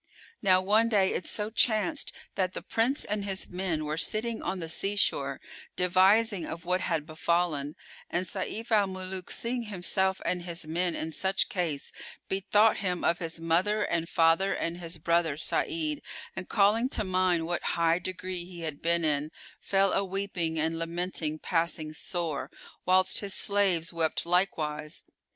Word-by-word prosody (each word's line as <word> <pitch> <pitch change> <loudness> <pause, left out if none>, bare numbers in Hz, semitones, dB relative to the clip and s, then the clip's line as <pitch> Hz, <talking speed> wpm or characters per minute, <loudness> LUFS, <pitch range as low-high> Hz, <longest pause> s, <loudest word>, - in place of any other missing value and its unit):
Now 185 -1 +5
one 215 +4 +4
day 195 -4 +3
it - - -3
so 210 0 -2
chanced 235 +7 +2 0.2
that 185 -1 -1
the - - -5
Prince 245 +6 +1
and 205 0 -2
his 195 -1 -3
men 180 -4 -2
were 150 +1 -2
sitting 220 +5 -1
on 190 +1 -2
the 165 - -4
sea 195 +5 0
shore, 140 -8 +1 0.4
devising 190 +2 +4
of 165 +1 -6
what 180 +1 +1
had 165 -4 -1
befallen, 155 -2 0 0.3
and 180 +2 -1
Sayf 215 +5 -4
al 210 -3 +4
Muluk, 185 -1 -5
seeing 240 0 -2
himself 190 -1 0
and 180 -1 0
his 170 -2 -2
men 170 +2 -1
in 160 - -4
such 190 +4 +1
case, 165 -7 -2 0.4
bethought 205 +3 +3
him 180 -3 -2
of 170 - +2
his 165 -1 -4
mother 180 +6 +1
and 170 -3 -1
father 165 +4 +3
and 170 +1 -3
his 170 -1 -4
brother 165 -2 +1
Sa'id 310 - -1 0.3
and, 185 - -6
calling 220 +4 +3
to - - +1
mind 185 -3 +1
what 175 +1 -2 0.2
high 170 0 +3
degree 185 0 -4
he 175 -1 -10
had 155 -3 -5
been 170 0 +1
in, 150 0 0 0.3
fell 195 0 +2
a 195 - +2
weeping 185 -4 -2
and 160 +1 0
lamenting 165 -2 -2
passing 165 -2 -1
sore, 155 -5 -2 0.4
whilst 185 +1 +4
his 200 -2 -1
slaves 190 -5 +2
wept 165 -1 0
likewise. 155 -4 0
180 Hz, 165 wpm, -29 LUFS, 165-195 Hz, 0.4 s, Now